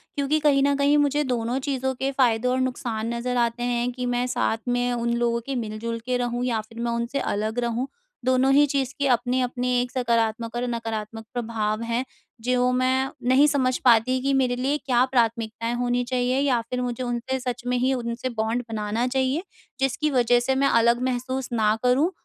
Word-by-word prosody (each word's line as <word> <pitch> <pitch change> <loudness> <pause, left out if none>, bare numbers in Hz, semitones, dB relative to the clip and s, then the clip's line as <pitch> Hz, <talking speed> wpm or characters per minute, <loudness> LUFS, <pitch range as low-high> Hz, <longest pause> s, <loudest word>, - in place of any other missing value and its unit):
क्योंकि 285 +2 +1
कहीं 290 -2 +3
न 280 0 +3
कहीं 285 +1 +3
मुझे 290 0 +2
दोनों 240 +1 -1
चीज़ों 265 -1 -1
के 270 +2 -1
फायदे 240 -2 +3
और 255 +1 +1
नुकसान 235 -3 -2
नज़र 245 +1 -2
आते 235 0 0
हैं, 245 0 0
कि 250 0 -5
मैं 245 0 0
साथ 225 -2 0
में 245 0 +1
उन 235 0 -1
लोगों 235 0 +1
के 275 - -3
मिल-जुल 230 0 -4
के 250 0 0
रहूँ 245 0 -2
या 230 -3 0
फिर 225 +2 -13
मैं 235 0 -1
उनसे 235 +4 -2
अलग 215 +3 -2
रहूँ। 240 +2 -1 0.4
दोनों 255 +1 +3
ही 290 +1 +6
चीज़ 275 -2 -1
के 280 - +2
अपने-अपने 250 0 0
एक 245 0 -4
सकारात्मक 230 -2 0
और 240 - -1
नकारात्मक 225 -2 -4
प्रभाव 220 -3 -2
हैं। 240 +2 +1 0.4
जो 250 0 +2
मैं 260 +1 +1 0.2
नहीं 270 +3 +6
समझ 260 -3 +1
पाती 245 +2 +4
कि 275 +1 +1
मेरे 255 -2 +2
लिए 270 +4 0
क्या 255 -4 +2
प्राथमिकताएँ 230 -1 0
होनी 245 0 +1
चाहिए 250 +1 0
या 265 -4 +2
फिर 250 0 -2
मुझे 245 0 -3
उनसे 245 +2 -2
सच 250 -1 -4
में 250 0 +1
ही 255 +2 +2
उनसे 235 0 -3
बॉन्ड 225 +3 0
बनाना 220 +2 -1
चाहिए। 265 +5 0 0.4
जिसकी 270 +3 0
वजह 245 -2 +3
से 265 - +3
मैं 275 +1 +3
अलग 235 0 +3
महसूस 255 +1 -2
ना 215 -2 +2
करूँ, 265 +8 +3
245 Hz, 195 wpm, -24 LUFS, 235-260 Hz, 0.4 s, ही